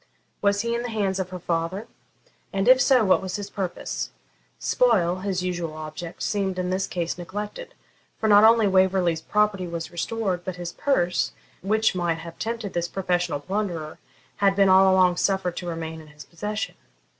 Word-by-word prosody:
Was 200 0 +2
he 235 +1 -1
in 235 - -1
the 245 - -4
hands 200 -4 -1
of 185 -1 -2
her 185 - -6
father? 170 +4 -2 0.7
and 195 +2 -1
if 255 +1 +7
so, 255 -5 +4
what 190 - +4
was 185 -1 -4
his 205 -1 -5
purpose? 190 -4 -4 0.5
Spoil, 180 - +2
his 185 -1 -2
usual 175 -3 -3
object, 155 +2 -7
seemed 195 -3 -1
in 180 0 -1
this 190 +1 0
case 175 0 -3
neglected; 210 - -6 0.4
for 220 - 0
not 205 0 +7
only 225 0 +6
Waverley's 185 -3 +2
property 210 -2 +1
was 170 0 -5
restored, 185 0 -2
but 185 -1 -4
his 175 -1 -6
purse, 180 -11 +1 0.3
which 220 +3 +2
might 175 -2 0
have 165 0 -10
tempted 225 -3 -3
this 175 0 -1
professional 175 -5 -1
plunderer, 175 -3 -3 0.4
had 195 -1 +3
been 195 -1 +4
all 190 0 +6
along 185 -1 +4
suffered 190 -3 0
to 175 - -5
remain 160 -1 -5
in 155 - -15
his 150 0 -13
possession. 210 +5 -4
185 Hz, 180 wpm, -25 LUFS, 175-205 Hz, 0.7 s, if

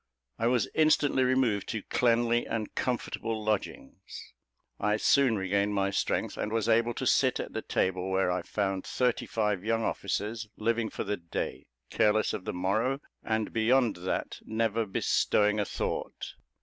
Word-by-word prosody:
I 115 - +2
was 120 -4 +2
instantly 150 -4 +3
removed 125 -6 +1
to 110 -3 -3
cleanly 120 0 +2
and 110 -2 -3
comfortable 115 -3 -2
lodgings. 105 -2 -4 0.5
I 105 +1 +1
soon 130 0 +3
regained 100 +2 0
my 100 0 +1
strength, 100 - -1
and 105 - -2
was 115 -1 0
able 115 +1 +3
to - - -3
sit - - +3
at - - -5
the - - -2
table, 95 0 -1
where 95 -1 +1
I 90 0 -1
found 95 +1 -2
thirty 125 -2 0
five 105 -4 -1
young 115 +1 0
officers, 110 +3 -2
living 115 0 0
for - - -4
the 105 - -2
day, 85 -1 -5 0.2
careless 110 0 +2
of 95 - -5
the - - -2
morrow; 110 +9 0 0.2
and, 110 -1 -1
beyond 115 -1 +3
that 90 +1 -3
never 110 0 0
bestowing 105 +2 +2
a 105 - +1
thought. - - -4
110 Hz, 160 wpm, -29 LUFS, 100-115 Hz, 0.5 s, instantly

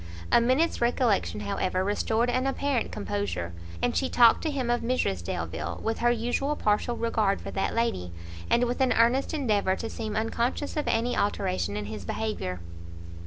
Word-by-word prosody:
A - - +6
minute's 260 +7 +2
recollection, 235 - +1
however, 185 - -1
restored 220 +4 +1
an 255 +2 0
apparent 270 -3 0
composure, 90 -3 -3 0.3
and 245 - +1
she 265 - +1
talked 235 -2 +6
to 320 - -1
him 260 -5 -1
of 240 - +1
Mrs 230 - 0
Delvile, 85 -1 -4
with 225 0 -1
her 240 - +3
usual 245 +5 0
partial 215 0 0
regard 220 -4 +1
for - - -7
that 195 - -1
lady, 230 - -1 0.4
and 240 - +4
with 245 +2 -2
an 260 - +4
earnest 240 +4 +3
endeavour 210 -10 +1
to 225 - -5
seem 215 -2 -4
unconscious 235 +5 -1
of 300 - -1
any 240 +2 +1
alteration 95 - -1
in 105 - -3
his 105 -1 -6
behaviour. 90 - -3
225 Hz, 170 wpm, -27 LUFS, -, 0.4 s, A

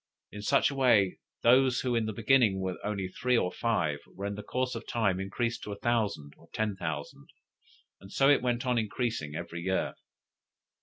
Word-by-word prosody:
In 105 - -7
such 140 +6 +3
a - - -6
way 110 -8 +3 0.2
those 125 +1 +5
who 125 -1 -1
in 115 -2 +1
the - - -1
beginning 110 -2 +3
were 95 -1 -3
only 100 -3 -2
three 125 +6 0
or 90 - +1
five, 85 -9 0
were 100 - -8
in 100 - -2
the 105 - -6
course 130 +3 -2
of 115 -1 -7
time 100 -6 +1
increased 115 +5 -2
to 105 - -6
a - - -8
thousand 105 -12 -1
or - - -20
ten 110 -2 -1
thousand, 80 -5 -5 0.7
and 95 - -14
so 135 - +3
it 145 0 +5
went 120 0 -1
on 125 -2 +2
increasing 110 - -2
every 85 0 -5
year. 95 +1 -1
110 Hz, 195 wpm, -29 LUFS, 95-120 Hz, 0.7 s, those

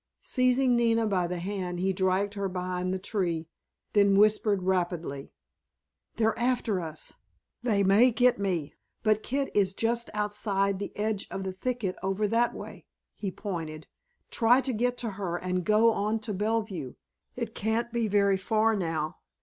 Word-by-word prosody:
Seizing 255 0 +3
Nina 230 -1 +3
by 185 -4 +1
the 180 +1 -3
hand 180 -1 -3
he 190 +1 +1
dragged 190 +2 +1
her 200 -1 -2
behind 180 0 -2
the 190 - 0
tree, 180 -5 -2 0.5
then 200 -1 +5
whispered 210 -2 +3
rapidly: 175 -6 -1 0.8
"They're 220 -1 +2
after 240 -5 +1
us! 160 -2 -5 0.5
They 215 -5 +2
may 205 +6 +6
get 245 -1 +3
me, 180 -7 -1 0.3
but 215 -1 +3
Kit 275 +3 -2
is 195 -2 +2
just 235 +1 0
outside 200 -2 0
the 200 - -4
edge 210 -1 -1
of 195 - -4
the 190 -1 -3
thicket 220 -2 -2
over 195 +2 0
that 235 +2 +2
way," - - -9 0.3
he 200 - -3
pointed; 165 -5 -5 0.5
"try 240 +2 +5
to 265 -1 -1
get 245 +2 0
to 235 - -2
her 175 -3 -1
and 180 0 -2
go 215 +5 +4
on 215 +1 0
to 215 -1 -3
Bellevue. 205 - -2 0.4
It 235 -3 -4
can't 225 +3 -1
be 235 -2 +1
very 200 -1 +3
far 220 +3 +2
now. 165 -5 -2
200 Hz, 160 wpm, -28 LUFS, 185-225 Hz, 0.8 s, may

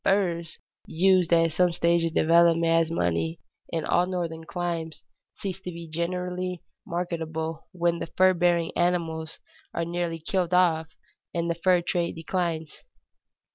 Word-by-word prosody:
Furs, 175 -5 0 0.3
used 185 0 +3
at 165 -1 +4
some 180 +2 +3
stage 170 0 +2
of 165 - -3
development 165 0 +4
as 165 -1 +3
money 85 - -1 0.3
in 160 -2 -2
all 180 - +2
northern 170 -3 -3
climes, 170 -2 -4 0.3
cease 195 -2 -4
to 180 - -6
be 170 -1 -8
generally 180 +2 -3 0.2
marketable 165 -2 -3
when 170 -2 0
the - - -4
fur 185 +2 +4
bearing 175 -1 +2
animals 165 -3 -1 0.4
are 170 - 0
nearly 170 -1 -2
killed 180 +1 -1
off 165 -3 +3 0.5
and 170 0 0
the - - -1
fur 180 -2 +4
trade 170 -1 -1
declines. 165 -2 -3
170 Hz, 140 wpm, -26 LUFS, 165-180 Hz, 0.5 s, at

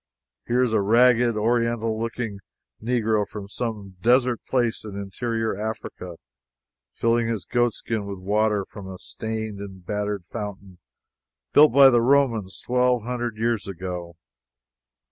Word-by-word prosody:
Here 125 +2 +3
is 120 -3 0
a 110 - +3
ragged, 120 +2 +4
oriental 115 0 0
looking 115 -3 -4 0.4
Negro 110 -3 +1
from 100 -2 -8
some 105 -4 -5
desert 125 +1 +3
place 120 -3 0
in 105 -2 -8
interior 110 +3 -2
Africa, 105 -4 -6 0.8
filling 115 0 +1
his 115 -3 -2
goatskin 115 -3 -1
with 100 -1 -5
water 105 +1 +1
from 100 0 -10
a 95 -1 -7
stained 110 0 -5
and 95 -3 -9
battered 105 -1 -2
fountain 100 -3 -7 0.7
built 150 +1 +7
by 135 0 +8
the 120 -1 +4
Romans 120 -7 +2
twelve 125 -1 +2
hundred 120 -2 -3
years 115 -1 0
ago. 90 -2 -6
110 Hz, 130 wpm, -24 LUFS, 100-120 Hz, 0.8 s, by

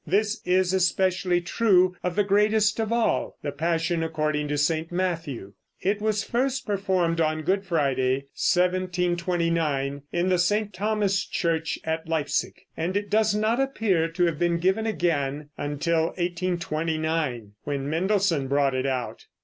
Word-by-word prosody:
This 210 +3 +1
is 185 0 +2
especially 185 -1 +2
true 185 -1 +3
of 180 -1 -2
the 205 - +3
greatest 210 +2 +2
of 220 0 -1
all, 235 -1 0
the 145 - -2
Passion 165 +3 0
according 155 -2 -1
to 145 0 -1
St. 160 +3 0
Matthew. 165 - -3 0.3
It 205 +2 0
was 215 -1 0
first 260 +3 -1
performed 185 -5 0
on 155 0 0
Good 190 +4 +1
Friday, 140 -6 0 0.2
1729, 175 -5 0
in 175 +2 0
the 180 -1 +2
St. 205 +4 +1
Thomas 205 0 0
church 165 -2 -1
at 160 0 -3
Leipsic, 160 -3 -1
and 175 +4 -1
it 205 0 -4
does 215 -1 +3
not 215 +3 +1
appear 220 -11 +1
to 170 +2 0
have 165 -3 -1
been 175 -1 +2
given 190 +6 +1
again 150 -7 -1
until 160 +3 0
1829, 160 - -2
when 140 -1 -2
Mendelssohn 170 -2 +1
brought 140 0 +2
it 130 +1 -1
out. 130 -2 -3
175 Hz, 145 wpm, -25 LUFS, 155-195 Hz, 0.3 s, true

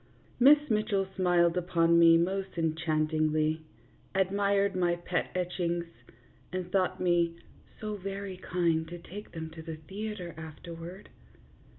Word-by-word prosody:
Miss 280 +4 +9
Mitchell 210 -3 +1
smiled 175 -2 +3
upon 170 -1 +3
me 165 0 +8
most 190 +2 -1
enchantingly, 155 -1 +1 0.5
admired 200 +1 +2
my 175 -1 +2
pet 175 0 -2
etchings, 175 -1 -1 0.7
and 180 -1 -4
thought 190 -2 +1
me 170 -2 +2 0.2
" - - -27
so 215 -1 -4
very 195 0 -5
kind 170 -3 0
to 175 +1 -7
take 200 +4 -10
them 160 -1 -6
to 160 0 -9
the 160 0 -6
theatre 190 +3 -6
afterward." 165 +4 -9
175 Hz, 125 wpm, -30 LUFS, 165-195 Hz, 0.7 s, Miss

